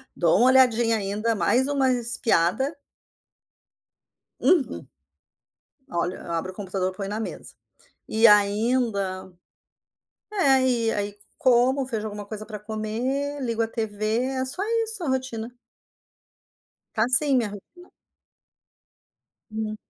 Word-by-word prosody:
dou 170 Hz, -2 st, +3 dB
uma 245 Hz, -, +5 dB
olhadinha 240 Hz, -3 st, +4 dB
ainda, 210 Hz, +3 st, -1 dB
mais 215 Hz, +8 st, +2 dB
uma 275 Hz, -2 st, +1 dB
espiada 240 Hz, -, +1 dB, 1.7 s
Uhum. 340 Hz, -7 st, +1 dB, 1.0 s
Olha, 175 Hz, +1 st, -3 dB
abro 170 Hz, +3 st, -3 dB
o -, -, -14 dB
computador, 190 Hz, -2 st, -3 dB
põe 195 Hz, +1 st, -5 dB
na 210 Hz, +2 st, -4 dB
mesa. 225 Hz, -, -7 dB, 0.5 s
E 220 Hz, +1 st, +2 dB
ainda 205 Hz, -2 st, +2 dB, 1.0 s
é, 275 Hz, -10 st, +3 dB
e 230 Hz, -3 st, +1 dB
aí 205 Hz, -1 st, -3 dB, 0.2 s
como, 255 Hz, +2 st, +3 dB
vejo 220 Hz, -4 st, -4 dB
alguma 205 Hz, -1 st, -7 dB
coisa 215 Hz, +1 st, -7 dB
pra 215 Hz, -1 st, -8 dB
comer, 235 Hz, +7 st, -3 dB
ligo 230 Hz, -2 st, -1 dB
a 225 Hz, -, +1 dB
TV, 220 Hz, +1 st, -2 dB
é 260 Hz, 0 st, -2 dB
só 285 Hz, +9 st, 0 dB, 0.2 s
isso 440 Hz, -4 st, +3 dB
a -, -, -3 dB
rotina. 245 Hz, -3 st, -3 dB, 1.4 s
Está 220 Hz, -, +2 dB
assim 260 Hz, +3 st, +4 dB
minha 235 Hz, -4 st, +1 dB
rotina. 335 Hz, -, -13 dB, 1.6 s
Hum. 215 Hz, 0 st, -4 dB
225 Hz, 120 wpm, -24 LUFS, 205-260 Hz, 1.7 s, uma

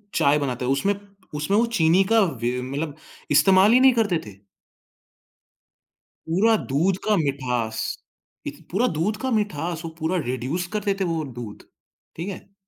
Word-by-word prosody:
चाय 145 Hz, +1 st, +4 dB
बनाते, 125 Hz, -3 st, -3 dB
उसमें 140 Hz, +10 st, +1 dB, 0.4 s
उसमें 155 Hz, +8 st, 0 dB
वो 230 Hz, -, +4 dB
चीनी 185 Hz, -5 st, +3 dB
का 225 Hz, -, +6 dB
वे 125 Hz, -, -1 dB
मतलब 140 Hz, +4 st, -4 dB, 0.4 s
इस्तेमाल 190 Hz, +7 st, +6 dB
ही 250 Hz, -, +6 dB
नहीं 260 Hz, 0 st, +6 dB
करते 215 Hz, -7 st, +1 dB
थे। 105 Hz, -, -9 dB, 2.0 s
पूरा 215 Hz, +7 st, +3 dB
दूध 170 Hz, +8 st, +1 dB
का 215 Hz, -, +4 dB
मिठास, 125 Hz, -7 st, -1 dB, 0.7 s
इत -, -, -8 dB
पूरा 220 Hz, +8 st, +2 dB
दूध 205 Hz, +7 st, 0 dB
का 260 Hz, -, -1 dB
मिठास 175 Hz, -7 st, -1 dB
वो -, -, -4 dB
पूरा 160 Hz, +4 st, 0 dB
रिड्यूस 130 Hz, +9 st, -2 dB
कर 210 Hz, -, 0 dB
देते 195 Hz, -1 st, 0 dB
थे -, -, 0 dB
वो 165 Hz, -1 st, -1 dB
दूध, 115 Hz, -3 st, -8 dB, 0.5 s
ठीक 170 Hz, +4 st, -5 dB
है? 195 Hz, 0 st, -10 dB
165 Hz, 155 wpm, -23 LUFS, 135-200 Hz, 2.0 s, का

